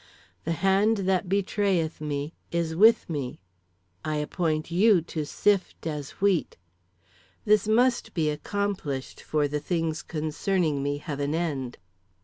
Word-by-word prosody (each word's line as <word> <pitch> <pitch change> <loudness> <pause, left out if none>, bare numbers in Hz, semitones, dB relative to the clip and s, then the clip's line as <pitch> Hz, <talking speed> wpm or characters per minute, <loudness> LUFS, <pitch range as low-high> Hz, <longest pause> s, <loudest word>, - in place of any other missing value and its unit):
"The 165 - 0
hand 200 +3 +4
that 185 -1 +1
betrayeth 195 -5 0
me 145 +1 -3 0.2
is 170 -1 -1
with 220 +5 +6
me. 145 -6 -4 0.6
"I 155 0 -1
appoint 155 +1 -1
you 195 +1 +5
to 155 -3 -4
sift 200 -1 0
as 150 -3 -3
wheat. 195 -4 +1 0.9
"This 210 0 +4
must 240 +3 +2
be 155 -3 +1
accomplished, 155 -4 -3
for 150 -1 0
the 150 +1 -2
things 165 0 -1
concerning 155 0 -1
me 145 +1 -1
have 145 -1 -5
an 145 +2 0
end. 145 -7 -2
165 Hz, 130 wpm, -27 LUFS, 150-195 Hz, 0.9 s, with